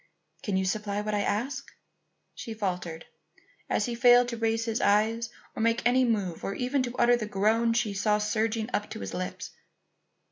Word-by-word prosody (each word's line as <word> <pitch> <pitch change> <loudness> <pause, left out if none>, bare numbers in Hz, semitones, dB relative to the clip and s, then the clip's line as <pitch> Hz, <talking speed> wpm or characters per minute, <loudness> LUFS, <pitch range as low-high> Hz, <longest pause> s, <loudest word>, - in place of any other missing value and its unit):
"Can 200 -3 -1
you 190 - 0
supply 205 +1 -1
what 210 0 -3
I 205 - +1
ask?" 245 +7 -2 0.6
she 225 - -7
faltered, 180 -5 -3 0.6
as - - +1
he 240 - -3
failed 245 +1 +5
to 235 - -4
raise 225 0 0
his 225 0 -1
eyes 220 +3 +2 0.3
or - - -3
make 230 +1 +2
any 255 +2 +4
move 200 -7 -1
or 195 - -3
even 255 +2 0
to 245 -1 -4
utter 245 0 +5
the 225 -3 -3
groan 220 +3 +2
she 230 -3 0
saw 210 +1 +2
surging 215 +1 -1
up 205 - -1
to - - -7
his 95 - -5
lips. 185 0 -5
220 Hz, 185 wpm, -28 LUFS, 205-235 Hz, 0.6 s, failed